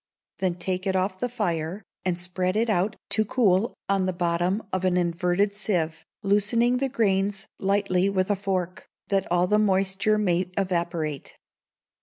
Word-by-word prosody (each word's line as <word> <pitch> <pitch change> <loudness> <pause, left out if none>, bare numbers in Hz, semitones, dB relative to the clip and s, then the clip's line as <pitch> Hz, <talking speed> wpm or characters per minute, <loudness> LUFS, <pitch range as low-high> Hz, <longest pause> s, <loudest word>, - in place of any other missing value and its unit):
Then 185 -2 0
take 185 +2 -3
it 190 - +1
off 185 0 0
the 245 - -1
fire, 180 -4 -2 0.2
and 180 -2 0
spread 180 +1 -1
it 225 0 +2
out 195 +2 +1
to 220 - +2
cool 215 -3 +2
on 195 -1 +1
the - - +1
bottom 175 +3 0
of 185 0 0
an 185 -1 +2
inverted 180 +3 +1
sieve, 175 -6 -2 0.2
loosening 215 +5 +2
the 270 +1 0
grains 200 -5 +1
lightly 195 -1 +2
with 190 0 0
a - - +3
fork, 185 -2 -3 0.2
that 195 -3 0
all 175 0 +3
the 210 +3 +3
moisture 195 +1 +2
may 180 -3 +1
evaporate. 170 -6 -2
190 Hz, 160 wpm, -25 LUFS, 180-205 Hz, 0.2 s, a